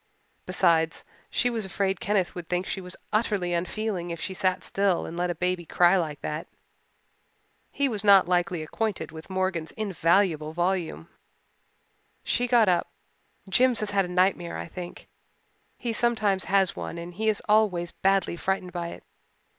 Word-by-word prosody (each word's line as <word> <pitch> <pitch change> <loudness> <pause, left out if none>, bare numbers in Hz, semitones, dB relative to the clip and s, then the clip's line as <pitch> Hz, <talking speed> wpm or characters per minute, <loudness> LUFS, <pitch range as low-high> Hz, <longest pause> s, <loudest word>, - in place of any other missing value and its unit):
Besides, 165 -1 +2 0.3
she 245 - +1
was 225 -2 -2
afraid 190 -1 -1
Kenneth 200 -3 0
would 175 -2 -8
think 180 +1 0
she 195 - -3
was 180 0 -6 0.2
utterly 205 -5 +1
unfeeling 180 +1 -2
if 170 -1 -5
she 190 - -4
sat 185 0 0
still 195 -3 +1
and 165 - -7
let 175 +1 -1
a 175 - -1
baby 180 +1 -1
cry 175 +2 +4
like 155 -5 -1
that. 150 +2 -4 1.2
He 280 - +1
was 215 -5 -2
not 200 -3 +7
likely 175 -2 +1
acquainted 210 +3 -3
with 160 +2 -10
Morgan's 185 -4 -2
invaluable 170 -5 +1
volume. 175 - -1 1.2
She 245 +1 0
got 235 -3 +5
up. 180 -2 +2 0.6
"Jims 245 +5 +3
has 210 -1 -1
had 195 -1 +2
a - - -6
nightmare, 180 -1 +1
I - - -5
think. 175 +1 -8 0.7
He 235 -2 -3
sometimes 215 -5 +1
has 195 -1 +2
one - - -5
and 170 +1 -7
he 220 +4 0
is 210 - +1
always 205 -5 +2
badly 195 -2 +1
frightened 185 0 -2
by 175 -1 -3
it. - - -9
185 Hz, 160 wpm, -26 LUFS, 175-205 Hz, 1.2 s, not